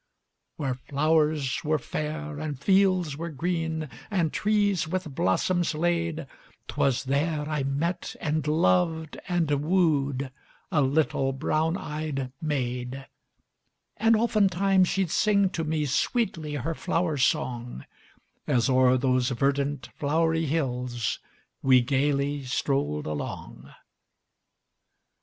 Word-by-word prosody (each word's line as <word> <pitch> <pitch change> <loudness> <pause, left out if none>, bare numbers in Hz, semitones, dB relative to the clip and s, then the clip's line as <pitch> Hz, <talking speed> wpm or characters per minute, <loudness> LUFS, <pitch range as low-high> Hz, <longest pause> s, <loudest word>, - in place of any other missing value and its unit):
Where 135 -4 -2
flowers 150 +1 +1
were 155 0 +1
fair 150 +2 -4
and 150 -4 -4
fields 185 -2 +3
were 170 +2 -4
green, 160 0 -2 0.2
And 175 -7 0
trees 205 -5 +1
with 175 -3 -3
blossoms 165 - +1
lade, 170 -1 0 0.4
'Twas 135 -3 +1
there 150 +3 0
I 155 -2 -1
met 150 +6 -2
and 155 -2 -1
loved 155 - +1
and 175 -4 0
wooed 145 -6 +1 0.4
A 150 - +3
little 135 -1 +1
brown 155 +5 0
eyed 150 -5 -4
maid; 130 -3 -3 0.9
And 225 +1 +4
oftentimes 195 -4 +3
she'd 190 -3 0
sing 200 -3 +3
to 165 -4 -2
me 155 -1 -1
Sweetly 155 - -1
her 145 +4 -2
Flower 165 0 -1
Song, 125 - -1 0.6
As 120 0 +2
o'er 130 0 +5
those 130 -1 +1
verdant, 140 +3 0
flowery 160 +2 +1
hills 125 -6 -1 0.4
We 130 -2 +5
gaily 140 +2 0
strolled 135 - -1
along. 75 -1 -6
150 Hz, 110 wpm, -27 LUFS, 135-165 Hz, 0.9 s, o'er